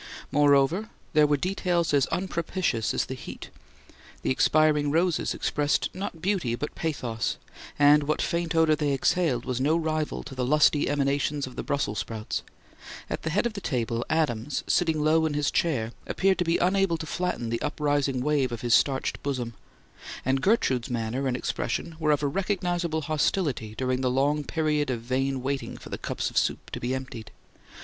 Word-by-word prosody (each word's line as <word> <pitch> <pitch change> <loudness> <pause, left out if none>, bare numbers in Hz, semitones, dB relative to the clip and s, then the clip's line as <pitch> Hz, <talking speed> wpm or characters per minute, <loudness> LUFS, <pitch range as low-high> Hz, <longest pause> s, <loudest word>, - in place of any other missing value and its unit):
Moreover, 145 +8 +3 0.2
there 150 -1 +5
were 145 0 +2
details 175 -1 0
as 140 -2 +3
unpropitious 170 - -1
as - - 0
the - - -5
heat: 130 - -9 0.7
the - - +1
expiring 150 +1 +3
roses 165 +2 +1
expressed 145 0 0
not 185 -3 -6
beauty 180 - 0
but 145 +5 -5
pathos, 125 -8 -2 0.4
and 145 +1 +6
what 150 +1 -1
faint 170 -1 -1
odour 160 -1 +4
they 145 -2 0
exhaled 135 -3 +1
was 130 -1 -2
no 155 +4 +3
rival 155 -2 -2
to 140 - -9
the 130 -1 -2
lusty 150 +2 +3
emanations 145 0 0
of 130 - -10
the - - -3
Brussels 125 -8 -1
sprouts; 110 0 -4 0.7
at - - -2
the 160 - -2
head 195 +8 +1
of 235 - -1
the 200 - -6
table, 120 -5 -1
Adams, 145 -5 0
sitting 160 -4 +1
low 160 +1 +3
in 150 - -3
his 145 -1 +1
chair, 125 -9 0 0.2
appeared 190 -1 +1
to - - +3
be 165 +1 +2
unable 185 -1 +2
to 160 - -6
flatten 170 -7 -2
the 115 - -1
uprising 145 -3 0
wave 145 -3 +1
of 120 - -5
his 120 -2 +1
starched 135 +2 +2
bosom; 125 -4 -3 0.7
and 130 +1 +1
Gertrude's 135 - +2
manner 120 +3 -2
and 125 -1 0
expression 165 +5 -3
were 155 -1 0
of 150 -1 +2
a - - +2
recognizable 175 -2 -1
hostility 145 - -1
during 130 0 0
the 130 - +1
long 145 +4 +1
period 150 -3 0
of 120 -3 -2
vain 130 +2 -1
waiting 135 0 -3
for - - -11
the - - -5
cups - - -3
of - - +3
soup - - -2
to - - -4
be 125 +2 -1
emptied. 130 -4 -7
145 Hz, 180 wpm, -27 LUFS, 130-160 Hz, 0.7 s, and